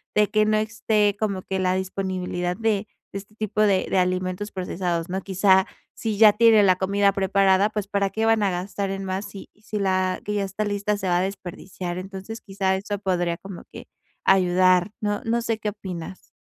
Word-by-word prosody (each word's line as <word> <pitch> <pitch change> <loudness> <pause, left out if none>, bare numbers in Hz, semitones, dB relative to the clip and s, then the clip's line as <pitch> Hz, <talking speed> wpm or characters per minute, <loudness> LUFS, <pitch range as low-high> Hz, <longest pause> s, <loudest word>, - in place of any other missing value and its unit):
de 210 -1 +3
que 215 0 +3
no 215 0 +2
esté 215 -1 +1
como 200 -4 -2
que 190 0 -3
la 185 0 +1
disponibilidad 185 -1 -3
de 220 -2 0 0.3
de 200 - -3
este 210 +2 -16
tipo 215 -1 -2
de 195 -3 +3
de 190 - +2
alimentos 185 +2 -1
procesados, 180 -2 -3
¿no? 190 +1 -2
Quizá, 190 0 +3 0.3
si 220 -2 -3
ya 215 -1 +7
tiene 225 -1 +6
la 185 -2 +5
comida 200 +1 +2
preparada, 195 +1 +3
pues, 210 -2 -4
para 200 -1 0
qué 220 +3 -1
van 225 -1 +3
a 195 - +2
gastar 190 +2 -3
en 195 0 -4
más 190 +2 -3
si 200 -1 -11
si 210 0 -6
la 185 -1 0
que 210 - -2
ya 205 -1 0
está 195 +2 -3
lista 205 0 -1
se 190 -2 -4
va 175 0 +2
a - - +1
desperdiciar. 185 -1 -5
Entonces, 195 +4 -8
quizá 195 -2 -1
eso 205 +1 -3
podría 175 -3 -1
como 195 -2 -9
que - - -10 0.4
ayudar. 185 0 +4
No 205 -1 -1
no 235 +1 0
sé 225 -1 -1
qué 215 - -2
opinas. 190 -3 -8
195 Hz, 200 wpm, -24 LUFS, 185-210 Hz, 0.4 s, ya